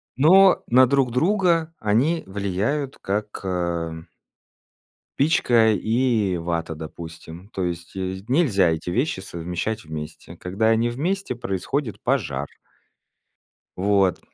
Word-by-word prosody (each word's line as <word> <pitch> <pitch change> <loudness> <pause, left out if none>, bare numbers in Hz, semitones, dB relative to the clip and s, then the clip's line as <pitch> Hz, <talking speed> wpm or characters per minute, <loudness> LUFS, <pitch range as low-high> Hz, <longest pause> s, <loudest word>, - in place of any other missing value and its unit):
Но 185 +8 +6
на 130 +2 +6
друг 135 -1 +2
друга 165 - +2
они 125 +11 +1
влияют 105 +9 -2
как, 105 +2 -3
ам 85 -3 -3 1.1
спичка 120 -7 +4
и 110 -3 +1
вата, 85 -1 -3
допустим. 80 +3 -10
То 95 - -3
есть 85 0 -5
есь 95 +3 -5
нельзя 120 - +3
эти 80 +2 -2
вещи 125 - 0
совмещать 90 +4 -4
вместе, 80 +2 -8
когда 95 +6 -1
они 115 +1 +2
вместе 180 +6 -2
происходит 120 +3 -3
пожар. 65 +2 0 1.3
Вот. 95 -1 +2
105 Hz, 110 wpm, -23 LUFS, 90-130 Hz, 1.3 s, Но